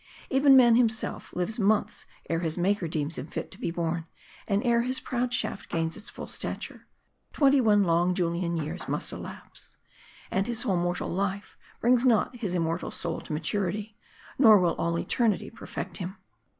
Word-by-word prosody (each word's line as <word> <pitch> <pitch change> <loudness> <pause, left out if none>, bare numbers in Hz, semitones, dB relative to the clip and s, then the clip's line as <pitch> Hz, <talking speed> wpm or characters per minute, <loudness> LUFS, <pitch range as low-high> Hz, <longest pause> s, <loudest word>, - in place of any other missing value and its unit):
Even 270 +1 +6
man 240 -3 +7
himself 225 -2 0
lives 180 +7 -2
months 210 +1 +1 0.2
ere 165 - 0
his 165 -1 -1
Maker 185 0 +1
deems 155 -1 -2
him 130 - -6
fit - - -6
to 190 - -10
be 245 - -2
born; 165 -1 -2 0.4
and 200 0 +1
ere 235 -1 +3
his 255 +2 +1
proud 245 0 -2
shaft 245 -5 -1
gains 165 0 -1
its 215 - -7
full - - -8
stature, - - -5 0.5
twenty 280 -2 +4
one 210 -3 +4
long 175 +1 +2
Julian 170 -1 -1
years 160 +3 -4
must - - -2
elapse. - - -10 0.5
And 195 +1 0
his 240 -1 0
whole 200 -7 +1
mortal 175 0 -1
life 195 +2 -3 0.3
brings 245 +1 +4
not 245 0 +3
his 205 -7 -2
immortal 165 0 -1
soul - - -4
to - - -10
maturity; 200 +6 -2 0.4
nor 220 -6 +8
will 175 -2 +2
all 170 0 0
eternity 230 +3 0
perfect - - -6
him. 190 +1 -6
195 Hz, 175 wpm, -27 LUFS, 170-235 Hz, 0.5 s, nor